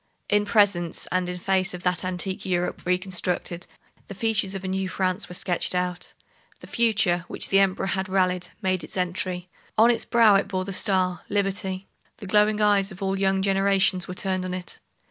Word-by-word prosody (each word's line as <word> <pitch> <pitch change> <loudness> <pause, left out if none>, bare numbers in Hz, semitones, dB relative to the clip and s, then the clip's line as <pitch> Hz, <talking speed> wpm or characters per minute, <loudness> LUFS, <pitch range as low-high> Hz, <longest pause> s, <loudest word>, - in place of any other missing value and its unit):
In 205 0 +2
presence 200 -5 +2
and 185 0 0
in 180 - -4
face 185 0 0
of 175 - -9
that 180 0 0
antique 185 +1 -2
Europe 180 -1 -2
reconstructed, 180 -1 -1 0.4
the 200 - -8
features 205 -2 0
of 195 - -5
a - - -4
new 190 0 -2
France 185 +1 0
were 180 - -7
sketched 180 0 -1
out. 180 0 -2 0.4
The - - -12
future, 200 -7 +1
which - - -1
the 195 - +4
Emperor 195 -1 +2
had 190 0 -1
rallied, 185 -1 +1 0.2
made 185 -3 0
its 155 - -8
entry. 180 0 -2 0.3
On 230 +2 +6
its 235 - -2
brow 230 -3 +5
it 195 - -1
bore 185 -1 -2
the 195 - -4
star, 185 -3 +2
Liberty. 195 -1 -2 0.3
The 215 - -8
glowing 210 +2 +3
eyes 205 -1 +3
of 190 +1 -8
all 195 0 0
young 195 0 +1
generations 195 -2 +2
were 180 - -6
turned 185 -1 -1
on 185 0 -3
it. 180 -1 -8
190 Hz, 190 wpm, -25 LUFS, 180-200 Hz, 0.4 s, On